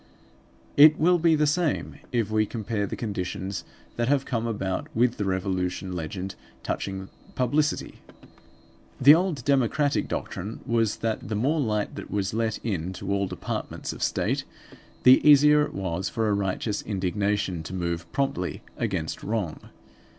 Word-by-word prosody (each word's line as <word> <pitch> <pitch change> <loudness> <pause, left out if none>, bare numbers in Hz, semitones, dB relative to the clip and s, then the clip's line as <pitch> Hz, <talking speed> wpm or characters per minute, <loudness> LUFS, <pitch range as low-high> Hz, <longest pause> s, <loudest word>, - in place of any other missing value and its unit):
It 155 +2 +9
will 175 +2 +4
be 165 -1 +4
the 150 0 +2
same 160 +1 0
if 115 -4 0
we 110 -1 +2
compare 110 -2 -2
the - - -4
conditions 100 -2 -4 0.3
that 120 0 0
have 140 0 +2
come 115 -2 -1
about 95 -4 -2
with 120 +1 +2
the 105 - -1
Revolution 95 -1 -2
legend 90 +3 -4 0.3
touching 95 -1 -4 0.3
publicity. 145 +4 0 1.0
The 140 +3 +9
old 165 -6 0
democratic 140 +1 +2
doctrine 100 +5 -5
was 115 -2 +1
that 110 -3 -2
the 110 - -1
more 140 +9 +1
light 105 -4 -1
that - - -8
was 100 -1 -1
let 110 -1 0
in 95 -4 -2
to 95 +2 -5
all 100 -1 0
departments - - -5
of - - -11
State, - - 0 0.6
the 130 +1 +8
easier 150 0 +7
it 150 - -1
was 95 -1 -2
for 110 -1 -1
a 105 - +2
righteous 100 +1 -1
indignation 100 -2 -1
to 80 - -8
move 85 -2 -3
promptly 135 -10 -2 0.2
against - - -2
wrong. 105 -7 -3
105 Hz, 150 wpm, -26 LUFS, 95-130 Hz, 1.0 s, It